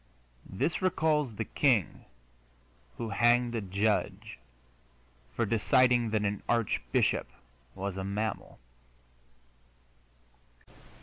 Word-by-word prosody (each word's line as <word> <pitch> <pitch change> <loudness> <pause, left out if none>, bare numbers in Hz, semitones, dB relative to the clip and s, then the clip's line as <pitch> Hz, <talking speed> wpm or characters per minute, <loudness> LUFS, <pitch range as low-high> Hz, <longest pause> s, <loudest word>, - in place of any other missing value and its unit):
This 130 - -2
recalls 155 - +1
the 115 - -3
king 120 - +1 0.9
who 115 - -4
hanged 120 +3 +3
a 115 - -2
judge 100 - -2 1.0
for - - +1
deciding 120 +2 +3
that 105 -1 0
an 100 0 -2
archbishop 105 - 0 0.5
was 95 0 -4
a 95 - -3
mammal. 100 +1 -4
110 Hz, 85 wpm, -29 LUFS, 100-120 Hz, 1.0 s, hanged